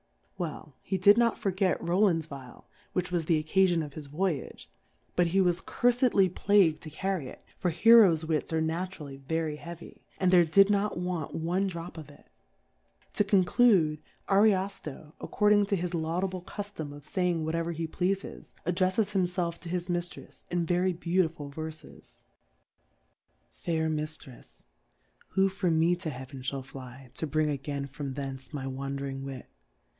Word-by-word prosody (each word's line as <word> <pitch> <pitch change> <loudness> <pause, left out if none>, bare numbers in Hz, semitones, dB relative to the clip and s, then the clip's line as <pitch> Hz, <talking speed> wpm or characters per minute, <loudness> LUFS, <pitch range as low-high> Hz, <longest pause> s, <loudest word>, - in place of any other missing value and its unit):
Well, 155 -3 -5
he 190 - -2
did 205 +4 +6
not 235 -1 +3
forget 190 -2 0
Kovo]and\ 175 -2 +2
Vial, 135 -4 -11 0.3
which 180 -1 -1
was 170 -3 0
the 165 0 +3
Occafion 175 -1 +3
of 145 - -11
his 150 -1 -8
Voyage; 155 -1 -3 0.5
but 175 -1 +3
he 185 +4 +1
was 180 -2 +2
curfedly 245 -5 +3
plagu'd 180 -3 +3
to 155 - -8
carry 180 -1 -2
it, - - -12
for 180 - -1
Htro^s 180 -3 +6
Wiis 160 -1 -1
are 160 0 +1
natu^ 175 +4 -3
rally 140 -2 -8
very 155 +2 -2
heavy, 170 +2 -10 0.2
and 185 -1 +3
there 180 -2 +7
did 195 +5 +5
not 205 -1 +1
want 180 -2 -3
one 175 +4 0
Drop 170 -2 -6
of 155 - -10
it: 145 - -17 0.9
To - - +2
conclude, 190 -5 +4 0.3
Ariofto^ 195 -7 +1
according 210 -1 +3
to 200 - +1
his 180 -1 -3
laudable 175 +3 -1
Cu 205 +3 -6
flom 160 -8 -7
of 145 - -12
faying 180 -3 0
whatever 165 +1 -1
he 165 0 -3
pleafes, 190 +4 -3
ad 175 - 0
drelTes 190 +2 +2
himfclf 180 -3 0
to 175 - -8
his 180 0 -2
Miitrefs 175 -1 -5
in 175 -1 0
very 180 +2 +1
beautiful 170 -4 -1
Verfes. 155 +1 -9 0.6
* - - -44
Fair 160 -2 0
'Mfirepy 150 -4 -7 0.7
ivhofor 190 0 +2
ine 165 +1 +3
to 175 -2 -4
Heaven 130 0 -8
fiaU 135 0 -4
fly^ 130 -1 -11
To 160 - -4
hring 155 +1 +1
again 140 0 -3
from 140 -1 -6
thence 135 -1 -6
my 145 -4 -5
"d 135 - -3
ahAririg 135 0 -4
IVit 135 -2 -6
170 Hz, 160 wpm, -29 LUFS, 150-185 Hz, 0.9 s, there